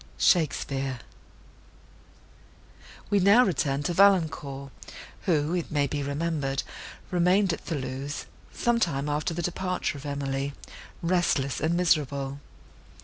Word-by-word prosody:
SHAKESPEARE 135 -5 +1 2.1
We 205 - +4
now 205 +7 +6
return 145 -5 0
to 175 - -1
Valancourt, 160 -8 +2 0.6
who, 155 -2 +2
it 175 -2 -2
may 145 -2 +1
be 145 +1 -2
remembered, 140 -1 -1 0.5
remained 180 +1 +3
at - - -5
Thoulouse, 135 -1 -4 0.3
some 240 -1 +1
time 145 -9 0
after 150 +3 -1
the 175 - -3
departure 180 -3 -2
of 145 - -8
Emily, 140 0 -2 0.5
restless 165 -6 +1
and 165 +2 +1
miserable. 140 -5 +1
150 Hz, 110 wpm, -27 LUFS, 140-175 Hz, 2.1 s, now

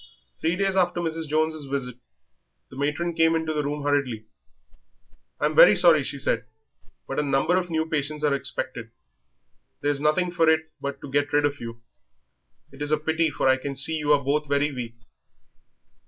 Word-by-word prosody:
Three 165 +2 +1
days 195 0 0
after 175 -2 +1
Mrs. 165 -1 -3
Jones' 155 0 0
visit 135 -3 -4 0.8
the - - -11
matron 150 +5 -1
came 165 0 +3
into 160 -1 -1
their 150 - 0
room 145 0 -3
hurriedly. 140 -6 -1 1.1
"I'm 150 +1 +1
very 210 - +8
sorry," 170 -5 +5
she 140 - -4
said, 115 -4 -1 0.6
"but - - -3
a - - +3
number 140 +4 +1
of 180 -1 -1
new 160 -1 0
patients 150 -1 -2
are 145 -2 +3
expected; 130 -3 -4 0.9
there's 145 0 0
nothing 175 +4 +1
for 165 -2 +3
it 160 0 +1
but 140 0 -4
to 140 - -9
get 145 +1 0
rid 145 0 +3
of 145 0 -1
you. 115 0 -8 0.9
It 135 +1 -14
is 145 - -1
a 155 - +4
pity, 160 +1 0
for 140 - -1
I 130 0 +4
can 140 +1 -5
see 160 +4 +1
you 150 0 0
are 140 -1 +2
both 150 +2 0
very 145 +1 +1
weak." 120 -3 -6
150 Hz, 185 wpm, -25 LUFS, 140-160 Hz, 1.1 s, very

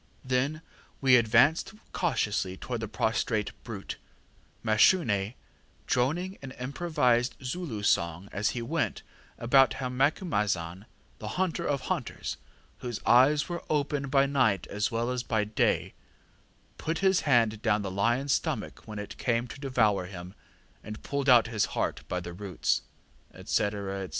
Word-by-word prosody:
ŌĆ£Then 135 +5 0 0.4
we 130 -2 +6
advanced 125 - +4 0.2
cautiously 105 - -1
towards 120 +1 -4
the 110 - -3
prostrate 110 0 0
brute, 105 -5 -6 0.7
Mashune 110 - +3 0.5
droning 170 +10 0
an 135 - -7
improvised 125 -3 0
Zulu 130 - -4
song 85 -1 +1
as 105 +2 0
he 120 - -3
went, 115 - -2 0.3
about 135 +3 +4
how 130 -2 -3
Macumazahn, 105 - 0 0.3
the 105 - -6
hunter 185 -2 0
of 140 -2 0
hunters, - - -3 0.4
whose 120 -3 -4
eyes 140 +5 +5
are 175 -2 -4
open 145 -1 0
by 135 0 +4
night 130 -9 +2
as 105 +1 0
well 115 +2 -1
as 125 -1 -1
by 110 -4 0
day, 105 +1 0 0.9
put 160 +1 -2
his 190 -1 +5
hand 115 -6 +2
down 105 -2 +1
the 95 - -4
lionŌĆÖs 120 +8 +1
stomach - - -1
when 110 -1 -7
it 105 0 -7
came 120 -1 +1
to 130 - -10
devour 110 -9 +1
him 90 -1 -9 0.5
and 105 0 -8
pulled 140 -1 -1
out 120 -2 +7
his 110 -2 0
heart - - -1
by 90 - -2
the 90 -1 -7
roots, 95 0 -1 0.5
&c., - - -11 0.3
&c. 100 -2 -4
120 Hz, 145 wpm, -28 LUFS, 105-140 Hz, 0.9 s, out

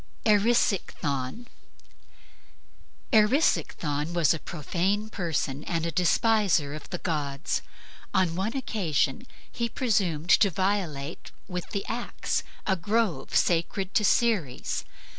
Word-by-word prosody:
ERISICHTHON 205 - +1 1.7
Erisichthon 180 - +2
was 170 -3 +4
a 165 - -4
profane 190 +8 -2
person 155 -6 -2
and 165 -1 -1
a 170 - -1
despiser 180 -3 +2
of 155 - -8
the 180 - -3
gods. 150 -4 -2 0.5
On 185 -4 +2
one 215 +8 -1
occasion 200 - -1 0.2
he 235 0 -2
presumed 190 - 0
to 200 - +6
violate 175 -6 -2 0.2
with 180 -1 -5
the 200 - -3
axe 240 +1 -2 0.2
a 190 - +2
grove 210 +2 -1
sacred 185 +3 +1
to 220 - +3
Ceres. 205 - +1
185 Hz, 105 wpm, -27 LUFS, 155-215 Hz, 1.7 s, to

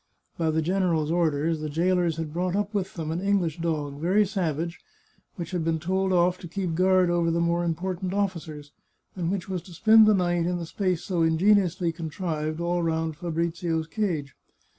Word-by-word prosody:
By 165 -1 0
the 160 0 +1
general's 170 -3 +1
orders, 160 -1 +1
the 155 0 -4
jailers 170 +1 +1
had 160 -2 -4
brought 180 +2 -1
up 205 +1 -1
with 195 -2 -2
them 160 -3 -3
an 170 +2 -2
English 190 -5 0
dog, 150 -4 -2
very 195 +5 +3
savage, 170 -4 -2 0.6
which 170 -2 -6
had 175 -3 -1
been 165 0 +1
told 190 +3 0
off 180 0 +2
to 175 - -8
keep 180 0 -3
guard 185 +1 +3
over 170 -1 +2
the 165 +1 +1
more 170 +1 +1
important 180 +2 -2
officers, 165 -7 -3 0.4
and 175 -2 -1
which 190 -3 -3
was 185 -2 -3
to 180 - -14
spend 220 +3 +6
the 215 - +5
night 175 -2 +1
in 180 0 0
the 170 - -4
space 180 0 -1
so 180 -3 -1
ingeniously 180 +1 +3
contrived 160 -1 -4
all 175 +1 0
round 160 -1 -1
Fabrizio's 165 0 -2
cage. 165 -7 -2
170 Hz, 185 wpm, -26 LUFS, 160-185 Hz, 0.6 s, spend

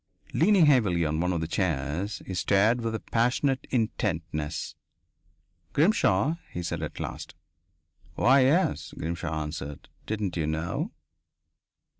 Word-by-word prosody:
Leaning 185 +1 +5
heavily 105 - +3
on 80 +1 -1
one 90 +2 +1
of 85 -2 -1
the 80 - -2
chairs, 85 +2 -2
he 95 - -5
stared 105 +6 +3
with 115 -1 -2
a - - -2
passionate 130 +3 0
intentness. 85 - -2 1.0
"Grimshaw?" 150 - +3
he 90 - -4
said 85 -1 -3
at 75 - -5
last. - - -6 0.8
"Why, 135 +3 +5
yes," 130 - +2
Grimshaw 80 -1 -3
answered. 75 -1 -7 0.2
"Didn't 105 -4 -2
you 80 -2 0
know?" 80 +2 -2
90 Hz, 125 wpm, -27 LUFS, 80-120 Hz, 1.0 s, Leaning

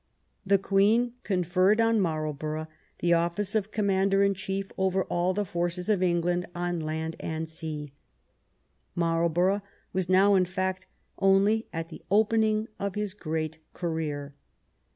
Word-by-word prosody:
The 200 0 +4
Queen 210 +5 +2
conferred 185 +2 +2
on 225 -1 +3
Marlborough 155 -2 -2 0.3
the 175 0 +3
office 170 +4 0
of 215 -2 0
commander 195 -1 +2
in 200 0 +3
chief 195 0 -4
over 190 0 +1
all 175 +1 0
the 205 +2 -1
forces 175 +2 -2
of 205 -4 +2
England 175 0 +1
on 175 0 -2
land 160 +1 -3
and 160 0 -3
sea. 155 -3 -6 1.0
Marlbor 170 +1 +2
ough - - -8 0.3
was 185 -1 -1
now, 195 +2 +5
in 185 -2 +4
fact, 185 0 -3 0.3
only 195 +3 +3
at 165 0 -4
the 165 - -10
opening 215 +1 +3
of 200 -1 -3
his 210 -2 -2
great 160 -4 -3
career. 155 -4 -3
185 Hz, 140 wpm, -28 LUFS, 165-200 Hz, 1.0 s, now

